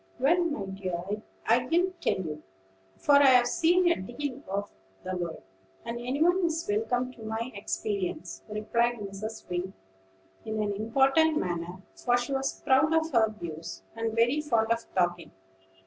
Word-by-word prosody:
"Well, 320 +8 +3
my 290 -12 -2
dear, 190 -2 -4 0.5
I'll 235 +2 +4 0.3
tell 345 - 0
you; 155 -4 -5 0.6
for 285 - +5
I've 260 -3 +7
seen 345 +7 +3
a - - +2
deal 255 +6 -5
of 200 +1 -3 0.3
the 185 0 -3
world, 175 -2 -4 0.4
and 235 +1 -4
any 255 +5 0
one 355 +2 +3
is 330 -1 0
welcome 245 +4 0
to 235 - -15
my 225 +3 -3
experience," 200 -3 -3
replied 235 +3 +1
Mrs. 210 +1 -7
Wing, 180 +2 -3 0.7
in 220 0 -3
an 205 -1 -1
important 270 +9 +3
manner; 175 - -3
for 245 0 +1
she 245 +3 -2
was 270 0 -2
proud 290 +5 +4
of 320 0 +1
her 225 -4 +4
"views," 160 - -7
and 225 -1 -2
very 240 +6 +3
fond 230 -6 +1
of 230 0 0
talking. 175 -2 +1
230 Hz, 155 wpm, -28 LUFS, 195-270 Hz, 0.7 s, I've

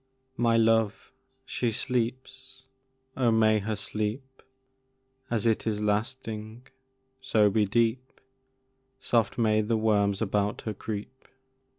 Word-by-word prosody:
My 115 -1 +2
love, 115 -1 +1 0.3
she 125 -2 -1
sleeps! 130 +3 -4 0.5
Oh, 125 -3 +2
may 110 -1 +4
her 110 +2 -3
sleep, 110 +6 -4 0.9
As 115 -3 -1
it 115 -1 +1
is 105 -2 0
lasting, 110 +1 -3 0.5
so 110 -6 +3
be 105 0 +2
deep; 115 +4 0 0.8
Soft 115 -4 +1
may 110 -2 +3
the 110 +1 0
worms 100 -2 +2
about 105 -1 -1
her 110 - -4
creep! 110 +5 -7
110 Hz, 110 wpm, -27 LUFS, 105-120 Hz, 0.9 s, may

